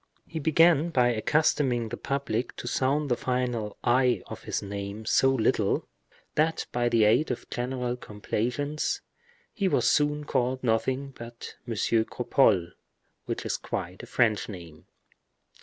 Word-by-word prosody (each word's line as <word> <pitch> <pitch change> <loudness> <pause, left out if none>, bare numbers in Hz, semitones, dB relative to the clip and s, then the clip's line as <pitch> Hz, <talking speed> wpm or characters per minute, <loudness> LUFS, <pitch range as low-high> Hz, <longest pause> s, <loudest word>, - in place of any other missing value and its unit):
He 160 - -5
began 165 +1 +4
by 125 -6 +3
accustoming 120 0 +1
the - - -4
public 135 -4 -2
to - - -7
sound 140 +4 +1
the 125 - +2
final 125 -4 -2
i 125 -3 +3
of - - -9
his - - -2
name 100 +2 -5
so 135 +4 +4
little, 130 -4 +1 0.5
that 160 +1 +1
by 120 0 +1
the 115 -2 +4
aid 115 +9 +4
of 125 - -4
general 125 0 -2
complaisance, 125 +7 -2 0.5
he 200 -3 0
was - - +2
soon 150 0 +2
called 130 -2 -1
nothing 130 +4 0
but 115 0 -9
M. 115 - -3
Cropole, 110 -4 +2 0.6
which - - -3
is - - -1
quite - - -5
a - - -10
French 110 -3 +1
name. 85 -6 -10
125 Hz, 140 wpm, -27 LUFS, 110-140 Hz, 0.6 s, began